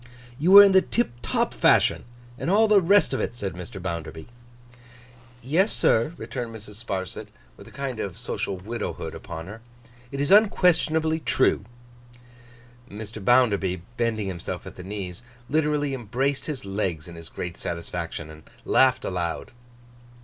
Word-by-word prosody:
'You 165 +5 +1
were 200 +1 +12
in 200 - +6
the 190 0 +6
tiptop 155 - -1
fashion, - - +3 0.3
and - - -2
all 215 +4 +5
the 210 -2 +5
rest 195 -2 +4
of 130 - -1
it,' 120 - -3
said 100 -5 -4
Mr. 90 +2 -8
Bounderby. 85 -3 -5 1.2
'Yes, 170 - +2
sir,' 115 +8 +2
returned 120 -3 -6
Mrs. 105 +1 -10
Sparsit, 95 -4 -4 0.3
with - - -14
a - - -14
kind 135 -4 -5
of 95 -4 -4
social 95 - -3
widowhood 110 +6 -5
upon 80 -1 -7
her. 105 +4 -10 0.5
'It 140 - -5
is 145 +4 0
unquestionably 165 -6 +4
true.' 130 -8 +1 1.2
Mr. 110 0 -8
Bounderby, 100 -7 +3
bending 115 -3 0
himself 90 -3 -5
at - - -9
the - - -9
knees, 95 -2 -6 0.3
literally 150 -1 +1
embraced 130 +3 -2
his 145 -8 -4
legs 95 -5 -3
in 85 - -10
his 85 -1 -10
great 85 -1 -6
satisfaction 85 -2 -5
and 80 0 -15 0.2
laughed 130 -1 +3
aloud. 85 -3 -3
115 Hz, 150 wpm, -25 LUFS, 90-145 Hz, 1.2 s, were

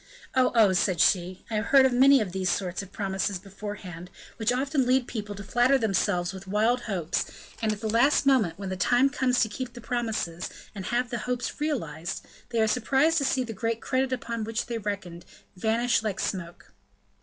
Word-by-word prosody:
"Oh! 255 -1 +3
oh!" 215 -5 +6
said 180 -1 +1
she; 180 +1 +2
"I - - -1
have 210 - -1
heard 270 +1 +6
of 260 - +2
many 270 +1 +6
of 200 -4 -3
these 185 0 -1
sorts 185 0 -1
of 195 -1 -11
promises 195 -1 -2
beforehand, 190 -2 -8 0.3
which 225 +1 +1
often 270 +1 0
lead 255 0 +3
people 210 -3 -5
to 200 - -8
flatter 245 +6 +3
themselves 195 -5 0
with 190 0 -10
wild 220 +5 +2
hopes, 175 -5 -1 0.4
and 220 -1 +1
at 210 0 -5
the 220 - -2
last 240 +7 +3
moment, 225 -12 +3
when 195 -1 -5
the 190 - -2
time 245 +8 +3
comes 255 -3 +1
to 225 - +3
keep 240 +3 -6
the 240 - -9
promises, 225 -8 -3 0.2
and 195 -3 -7
have 245 +1 0
the 235 - -2
hopes 250 +3 -3
realized, 175 - -3 0.2
they 230 - -1
are 220 - +4
surprised 270 +8 +2
to 280 - 0
see 260 -1 +1
the 230 -2 -6
great 230 +2 -2
credit 260 +2 0
upon 235 -3 -3
which 225 +1 -2
they 235 -1 -3
reckoned 200 -5 -5 0.3
vanish 225 +5 +1
like 215 -3 -3
smoke." 175 -3 -5
220 Hz, 200 wpm, -27 LUFS, 190-250 Hz, 0.4 s, oh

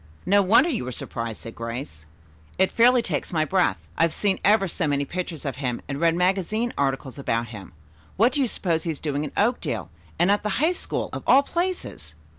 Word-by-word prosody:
"No 200 +3 +4
wonder 220 - +5
you 245 - -2
were 125 - -5
surprised," 115 -2 -5
said 115 - -7
Grace. 115 - -6 0.5
"It 190 0 +3
fairly 245 +1 +5
takes 150 -9 -2
my 155 -3 +1
breath. 180 - +2 0.2
I've 165 -1 +2
seen 200 -2 +1
ever 200 -1 +4
so 170 -1 -1
many 140 -1 0
pictures 175 -2 -5
of 135 -2 -3
him 125 -4 -2
and 140 0 -4
read 165 -1 +3
magazine 195 +6 0
articles 135 -1 -2
about 115 -3 -1
him. 100 -7 -10 0.4
What 230 +6 +4
do 280 - 0
you 260 - +2
suppose 170 -7 -1
he 170 - -4
is 155 - -3
doing 145 -1 -2
in 150 - -5
Oakdale, 235 +4 0 0.3
and 175 +3 +4
at 205 - +2
the 210 -2 -2
High 315 +7 +3
School 360 - -4
of - - -4
all 275 - +6
places?" 345 - -4
170 Hz, 210 wpm, -24 LUFS, 135-210 Hz, 0.5 s, all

